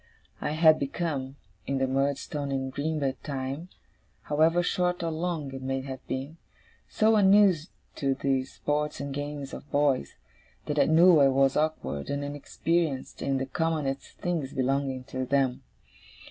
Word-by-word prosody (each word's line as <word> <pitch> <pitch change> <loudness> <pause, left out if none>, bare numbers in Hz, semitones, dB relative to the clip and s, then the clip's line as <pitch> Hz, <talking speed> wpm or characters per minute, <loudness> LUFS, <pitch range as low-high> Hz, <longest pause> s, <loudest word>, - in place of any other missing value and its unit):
I 150 - -1
had 155 0 +6
become, 140 -2 -3 0.3
in 135 - 0
the 135 - +2
Murdstone 140 +2 -1
and 130 -1 -2
Grinby 145 -2 -2
time, 140 +4 -4 0.5
however 160 +4 +3
short 180 -1 0
or 165 - -1
long 160 -4 -3
it 135 - -6
may 135 0 -2
have 130 -1 -7
been, 135 +5 -4 0.5
so 220 +1 +3
unused 195 -5 +5 0.3
to 135 -1 +1
the 135 -1 0
sports 150 +2 -2
and 140 0 -4
games 145 -1 -5
of 145 - -9
boys, 140 - +1 0.5
that 150 0 -1
I - - +5
knew 165 +1 +6
I 140 - +6
was 135 0 +3
awkward 155 - -1
and 140 0 -2
inexperienced 145 +1 -2
in 135 -1 0
the 135 - -1
commonest 145 -1 -2
things 160 -6 -2
belonging 135 -1 0
to 130 0 -4
them. 130 -1 +1
140 Hz, 150 wpm, -28 LUFS, 135-160 Hz, 0.5 s, had